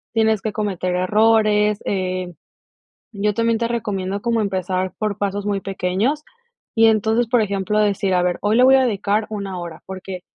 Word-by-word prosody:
tienes 220 -2 +2
que 215 - -2
cometer 190 -4 -2
errores, 210 +2 +3
eh 185 -2 -2 0.8
yo 205 +1 0
también 230 0 +1
te 230 - 0
recomiendo 205 -4 -3
como 235 -1 +1
empezar 185 -2 -2
por 210 -2 -2
pasos 200 0 -2
muy 200 -2 -1
pequeños 195 +10 -1 0.5
y 225 -1 +6
entonces, 220 +2 +2
por 235 -1 +3
ejemplo, 200 0 -1
decir, 200 -2 +1
a 180 - +2
ver, 180 -1 -1
hoy 210 +1 +1
le 250 - +5
voy 265 +1 +7
a 265 -1 +5
dedicar 210 -1 0
una 200 -4 -5
hora, 170 -1 -8
porque, 190 -1 -7
205 Hz, 175 wpm, -20 LUFS, 190-220 Hz, 0.8 s, voy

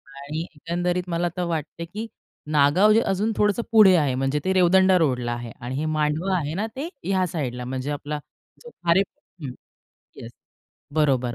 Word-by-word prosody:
आणि 145 +3 -5
एकंदरीत 175 +3 -1
मला 170 +1 0
तर 180 - 0
वाटते, 165 0 -4
की 215 +6 -6 0.4
नागाव 150 +9 +5
जे 225 - +4
अजून 210 +4 0
थोडंसं 210 +2 +2
पुढे 205 -5 +7
आहे. 145 -6 +2
म्हणजे 135 +3 0
ते 190 - +2
रेवदंडा 185 +1 +5
रोडला 125 -7 0
आहे 120 -1 -6
आणि 125 +2 -5
हे 155 +3 -2
मांडवा 160 +5 +1
आहे 150 -1 -3
ना, 210 +5 -2
ते 300 +6 -4
ह्या 190 -1 +1
साइडला 125 -7 -4
म्हणजे 130 +3 -3
आपला 145 +1 -4 0.4
जो 480 - -10
खारे 170 - +1
हं. 160 -7 -9 0.7
येस. 115 - -9 0.6
बरोबर, 130 -6 +2
165 Hz, 170 wpm, -24 LUFS, 140-185 Hz, 0.7 s, पुढे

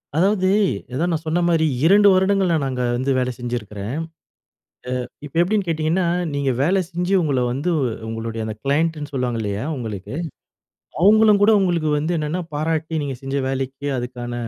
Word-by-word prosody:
அதாவது, 185 +2 +2 0.4
அதான் 165 +7 0
நான் 160 0 -2
சொன்ன 160 +3 +1
மாரி 165 -2 +3 0.2
2 205 +3 +6
வருடங்கள் 190 0 +3
நானு 155 -4 +1
அங்க 125 -1 -2
வந்து 130 +2 0
வேலை 125 0 0
செஞ்சுருக்கிறேன். 115 -2 -5 1.1
அ - - -6 0.2
இப்ப 145 - -12
எப்படின்னு 200 +3 +1
கேட்டிங்கன்னா, 165 +2 0 0.3
நீங்க 140 -1 0
வேலை 185 +6 +3
செஞ்சு 180 +2 -1
உங்கள 140 -6 +1
வந்து 140 +8 -2 0.4
உங்களுடைய 115 0 -4
அந்த 110 -1 -4
க்ளையண்ட்ன்னு 150 +1 0
சொல்லுவாங்க 125 -3 -1
இல்லையா? 100 +1 -3
உங்களுக்கு 110 -2 -6 0.9
அவங்களும்கூட 210 +1 +6
உங்களுக்கு 175 -5 +1
வந்து 155 +4 -1
என்னென்னா 155 +4 -2
பாராட்டி, 160 +1 -1
நீங்க 140 -2 -3
செஞ்ச 135 +1 -4
வேலைக்கு 135 +1 -3
அதுக்கான 120 -1 -5
150 Hz, 150 wpm, -21 LUFS, 125-175 Hz, 1.1 s, 2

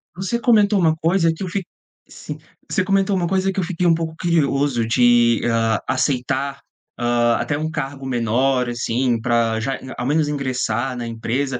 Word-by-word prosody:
Você 190 +6 -2
comentou 210 -3 +3
uma 160 -3 +3
coisa 165 +1 +2
que 175 - -7
eu - - -3
fi 190 +2 -3 0.4
sim. - - -8 0.3
Você 185 - +1
comentou 195 0 +1
uma 175 -2 0
coisa 190 +1 +1
que 190 - -3
eu - - 0
fiquei 175 0 -2
um 170 - +5
pouco 160 -1 -3
curioso 140 -8 +1
de, 120 -1 +4
hã, 115 -2 +1
aceitar, 140 +1 -1 0.4
hã, 120 0 +2
até 135 +5 -1
um 155 +1 -2
cargo 140 -3 -5
menor, 125 +1 +1
assim, 120 0 0
pra 115 -1 +1
já 135 +4 -2 0.2
ao 125 - -3
menos 150 +2 +1
ingressar 130 -3 -2
na 120 - -4
empresa. 125 +3 -2
135 Hz, 175 wpm, -20 LUFS, 120-170 Hz, 0.4 s, um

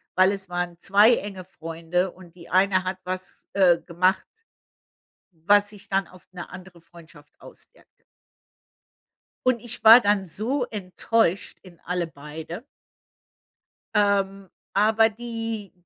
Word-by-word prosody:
weil 185 +1 +5
es 195 -1 -5
waren 175 -1 -4
2 205 +6 +5
enge 195 -2 -7
Freunde 170 +1 -3
und 175 -2 -16
die 170 - -14
eine 185 0 +2
hat 185 0 -3
was, 185 0 -7
äh, 180 -4 +4
gemacht 185 +2 0 1.2
was 205 0 +5
sich 205 -1 -13
dann 195 -2 0
auf 185 -1 -18
'ne 180 -1 -8
andere 180 -1 -12
Freundschaft 165 -3 -18
auswirkte. - - -17 1.4
Und 255 -2 +2
ich 240 +2 -5
war 225 +2 +10
dann 205 -4 +1
so 235 - -2
enttäuscht 195 -1 -1
in 180 -3 -16
alle 180 -1 -2
beide. 160 - -9 1.3
Ähm, 195 -2 +1 0.2
aber 220 +2 +4
die 225 -2 -6
190 Hz, 125 wpm, -24 LUFS, 175-205 Hz, 1.4 s, war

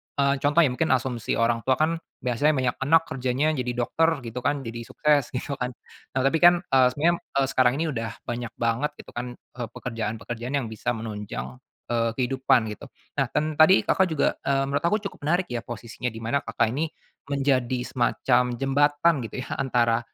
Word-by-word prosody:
eee, 140 0 +3
contohnya 145 0 +4
mungkin 155 +5 0
asumsi 125 -3 -2
orang 115 0 +2
tua 130 - +4
kan 160 +2 +2 0.3
biasanya 130 +5 +2
banyak 130 -1 0
anak 165 +2 +5
kerjanya 130 +3 0
jadi 125 -4 -2
dokter 160 +7 +2 0.2
gitu 115 +2 -5
kan 140 +2 0
jadi 115 +1 -5
sukses 145 -4 +2
gitu 135 +2 -3
kan, 125 - 0 0.5
nah 130 - +1
tapi 160 +4 +2
kan, 175 0 +8
eee, 130 -1 +6
sebenarnya, 170 +4 +3 0.2
eee, 140 0 +3
sekarang 125 -1 +4
ini 165 - 0
udah 115 -3 -3
banyak 120 0 -4
banget 115 +5 0
gitu - - -12
kan, 120 0 -5
eee, 120 -1 -8
pekerjaan-pekerjaan 115 +2 -4
yang 135 - -2
bisa 110 - -3
menunjang, 105 - -6 0.3
eee, 115 -1 +2
kehidupan 130 -2 +2
gitu - - -11 0.3
nah - - +2
dan 155 +1 -1
tadi 170 +5 +7
Kakak 190 - +3
juga, 155 -3 +1
eee, 135 0 +1
menurut 140 - 0
aku 210 - +3
cukup - - -6
menarik 175 +3 +2
ya 120 - -1
posisinya 120 +1 -6
di 115 - -10
mana 120 +5 +1
Kakak 115 +1 0
ini, 155 +5 0 0.4
menjadi 135 -3 +1
semacam 125 0 +2
jembatan 145 +5 +3
gitu - - -11
ya - - -11
antara, 120 -3 +2
130 Hz, 185 wpm, -25 LUFS, 120-145 Hz, 0.5 s, kan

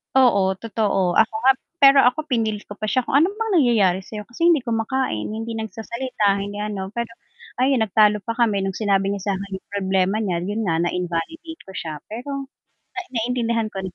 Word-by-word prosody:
Oo, 200 -8 +4
totoo, 195 -4 0
ako 220 0 +4
nga 265 - +7 0.3
pero 275 -2 +7
ako 250 +5 +2
pinilit 220 -7 -1
ko - - -8
pa 215 +1 -5
siya 255 +5 +1
kung - - -5
ano 340 - +3
bang 450 -1 -2
nangyayari 205 - +3
sayo, 210 +2 -8
kasi 330 +10 +1
hindi 310 -7 +3
kumakain, 225 - -1
hindi 225 +2 -4
nagsasalita, 220 -1 -1
hindi 205 +1 -5
ano 205 -2 -4
pero 235 -1 -3 0.5
ayun, 260 -3 +3
nagtalo 210 0 +4
pa 230 - -3
kami 220 -5 +1
nung 195 - -2
sinabi 195 -1 +1
niya 200 -1 -3
sakin 195 0 -5
yung - - -53
problema 190 0 0
niya, 175 -4 -1
yun 205 +5 -2
nga 165 -3 +1
na-invalidate 180 - -3
ko - - -9
siya 155 -2 -5
pero 275 +5 -5 0.5
na - - -3
naiintindihan 230 -2 -1
ko. 195 - -4
215 Hz, 185 wpm, -22 LUFS, 195-245 Hz, 0.5 s, nga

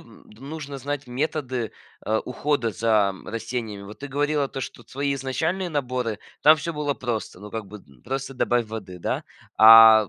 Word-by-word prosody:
д 105 - -17
нужно 140 0 -6
знать 145 0 -4
методы, 130 -3 -2 0.3
а, 110 0 +1
ухода 125 -1 -1
за, 110 0 +3
м, 95 - -14
растениями? 115 -2 -4
Вот 100 +2 -10
ты 145 - -5
говорила 145 0 0
то, 135 - -5
что 120 - -7
твои 140 +4 -2
изначальные 160 +8 -1
наборы- 125 -7 -2 0.2
там 155 +1 +8
всё 165 +3 -4
было 150 -2 -1
просто, 115 -8 -4
ну, 105 +1 -9
как 110 -2 -5
бы 105 +2 -10
д 70 -9 -21
просто 135 +1 -4
добавь 120 -2 +1
воды, 100 -5 -7
да? - - -2 0.3
А 110 -1 +10
125 Hz, 180 wpm, -24 LUFS, 110-145 Hz, 0.3 s, А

